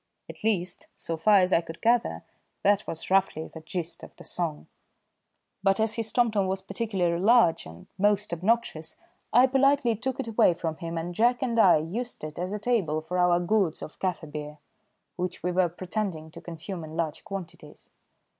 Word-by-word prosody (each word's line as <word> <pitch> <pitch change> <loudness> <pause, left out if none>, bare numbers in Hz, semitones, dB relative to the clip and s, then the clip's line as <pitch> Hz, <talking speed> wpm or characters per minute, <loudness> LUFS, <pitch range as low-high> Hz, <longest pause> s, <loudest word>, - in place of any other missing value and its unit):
At - - -11
least, 185 -5 -1
so 165 - -4
far 200 +4 +5
as 185 +1 +2
I - - +5
could 165 0 -10
gather 235 +1 +1 0.4
that 205 0 +3
was 165 +3 -5
roughly 190 -5 +2
the 160 - -10
gist 170 +1 -5
of - - -12
the - - -13
song; 165 -4 -3 1.0
but 195 0 +2
as 220 0 +1
his 225 -1 -2
tomtom 220 -5 +2
was 190 0 -2
particularly 190 -4 -1
large 225 -5 +4
and 80 +2 -12
most 205 -1 +2
obnoxious 175 -4 0 0.4
I 245 +2 +7
politely 270 -2 +3
took 260 +4 -3
it 265 - -3
away 220 -6 +4
from 160 -2 -3
him, 165 -1 -5
and 170 +2 -3
Jack 240 +6 +2
and 235 -3 0
I 185 -7 +7
used 205 +11 -4
it 155 +1 -6
as 180 +2 -2
a 210 - -2
table 205 -9 0
for 180 +3 -3
our 175 -1 +4
gourds 180 -2 +1
of - - -10
kaffir 175 -5 -3
beer, 150 0 -6 0.6
which 180 0 -4
we 180 - 0
were 180 -1 +2
pretending 180 -3 -4
to 170 - -11
consume 170 +1 -7
in 155 +1 -8
large 160 -2 -2
quantities. 175 -6 -9
185 Hz, 185 wpm, -27 LUFS, 165-220 Hz, 1.0 s, I